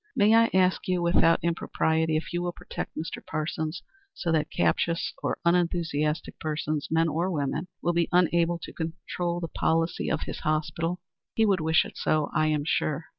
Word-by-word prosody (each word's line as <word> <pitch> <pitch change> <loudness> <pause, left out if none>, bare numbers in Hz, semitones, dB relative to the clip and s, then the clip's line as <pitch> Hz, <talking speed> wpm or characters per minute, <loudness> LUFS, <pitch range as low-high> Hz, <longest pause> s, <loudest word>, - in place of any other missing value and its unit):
May 210 +2 +5
I 230 0 +6
ask 185 0 +2
you 180 -1 +1
without 170 -1 +3
impropriety 160 -1 +1
if 160 - -5
you 175 - 0
will 175 0 -2
protect - - -7
Mr. 160 - -5
Parsons 155 +2 -3 0.3
so 170 - -2
that 155 -1 +1
captious 165 - 0
or - - -1
unenthusiastic 165 -3 0
persons, 155 -1 -2
men 165 +1 +3
or 165 +4 0
women, 155 +1 -2 0.2
will 175 - +2
be 170 -1 +1
unable 170 -1 +3
to - - -8
control 170 +1 -3
the 170 - -3
policy 165 +1 0
of - - 0
his - - -5
hospital? 165 +3 -1 0.3
He 225 - +4
would 195 -4 +2
wish 160 +1 +3
it - - -10
so, 155 -1 +1
I 155 -2 +2
am 150 -1 +1
sure. 155 0 0
165 Hz, 180 wpm, -27 LUFS, 155-175 Hz, 0.3 s, I